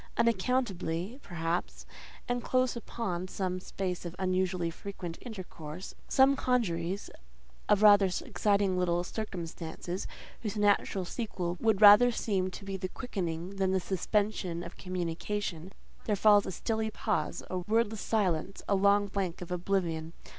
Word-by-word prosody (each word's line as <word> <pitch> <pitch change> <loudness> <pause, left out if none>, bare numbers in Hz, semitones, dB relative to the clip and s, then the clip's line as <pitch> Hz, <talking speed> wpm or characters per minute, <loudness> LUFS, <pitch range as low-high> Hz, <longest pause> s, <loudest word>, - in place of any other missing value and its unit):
Unaccountably, 230 -3 0
perhaps, 170 -3 -3 0.4
and 245 0 -1
close 255 -1 +1
upon 190 -6 -4
some 185 -1 -2
space 185 -1 -4
of 175 0 -6
unusually 185 -2 0
frequent 175 -1 -7
intercourse—some 190 - -1
congeries 195 -8 -1 0.6
of 210 0 +4
rather 205 -2 +7 0.2
exciting 200 -3 +1
little 175 -1 +1
circumstances, 175 -3 -5 0.3
whose 215 -1 -3
natural 205 -2 +2
sequel 180 -4 -3
would 220 -2 +3
rather 210 +4 +10
seem 195 -5 0
to 195 +2 -9
be 195 -1 -3
the 185 -1 -4
quickening 185 -6 -4
than 190 -1 +1
the 190 - +3
suspension 190 -2 -1
of 170 - -9
communication—there 185 +2 -4
falls 205 0 +5
a - - -2
stilly 220 +4 -1
pause, 210 -7 -2
a 185 - -1
wordless 220 +2 0
silence, 195 -4 0
a - - +2
long 200 +1 +4
blank 195 -3 -3
of 180 0 -8
oblivion. 170 -3 -1
190 Hz, 130 wpm, -30 LUFS, 175-210 Hz, 0.6 s, rather